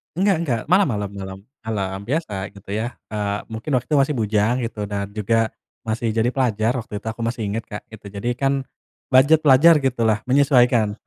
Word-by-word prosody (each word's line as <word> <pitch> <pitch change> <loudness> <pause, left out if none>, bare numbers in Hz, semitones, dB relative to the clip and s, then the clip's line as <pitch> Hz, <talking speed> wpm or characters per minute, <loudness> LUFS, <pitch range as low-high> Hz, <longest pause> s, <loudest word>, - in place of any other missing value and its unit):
Enggak 195 +3 +3
enggak! 135 -9 -1
Malam 190 0 +5
malam 105 -5 -2
malam 95 -1 -7 0.3
malam. 95 -3 -2
Biasa, 110 - -2
gitu 100 0 -11
ya. 110 +4 -3 0.2
Eee, 105 -1 -2
mungkin 110 +7 -5
waktu 125 +4 -2
masih 140 +2 +2
bujang, 110 0 +1
gitu. 110 -2 -4
Dan 100 0 -4
juga 110 +2 0 0.3
masih 115 0 -1
jadi 115 +1 +2
pelajar 115 -4 +1
waktu 105 -2 -6
itu, - - -11
aku 110 +1 -7
masih 115 0 -3
inget, 110 +3 -3
Kak, 105 - -7
gitu. 110 -2 -13
Jadi, 100 +4 -3
kan 135 +1 +1 0.6
budget 140 +5 +6
pelajar, 155 +4 +7
gitu 125 -3 0
lah, 110 0 +2
menyesuaikan. 125 -5 +3
115 Hz, 185 wpm, -22 LUFS, 105-130 Hz, 0.6 s, pelajar